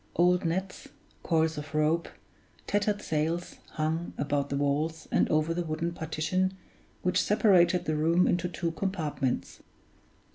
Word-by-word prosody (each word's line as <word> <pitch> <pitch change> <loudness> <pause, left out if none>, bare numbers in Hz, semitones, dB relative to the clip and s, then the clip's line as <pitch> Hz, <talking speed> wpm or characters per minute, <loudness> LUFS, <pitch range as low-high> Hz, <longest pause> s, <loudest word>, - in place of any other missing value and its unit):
Old 180 +1 +3
nets, 185 +3 -3 0.3
coils 160 -2 +1
of 150 +1 -8
rope, 155 +2 +1 0.6
tattered 205 0 0
sails, 160 +3 -2 0.2
hung, 160 +2 -2
about 140 0 -1
the 140 - -1
walls 150 +3 -1
and - - +2
over 155 +2 +2
the 175 - -1
wooden 165 +1 -2
partition 170 +4 -1 0.5
which 180 0 +2
separated 185 -5 +4
the 155 - 0
room 165 +4 +3
into 175 0 +1
two 170 0 -2
compartments. 165 -8 -2
165 Hz, 135 wpm, -29 LUFS, 155-180 Hz, 0.6 s, separated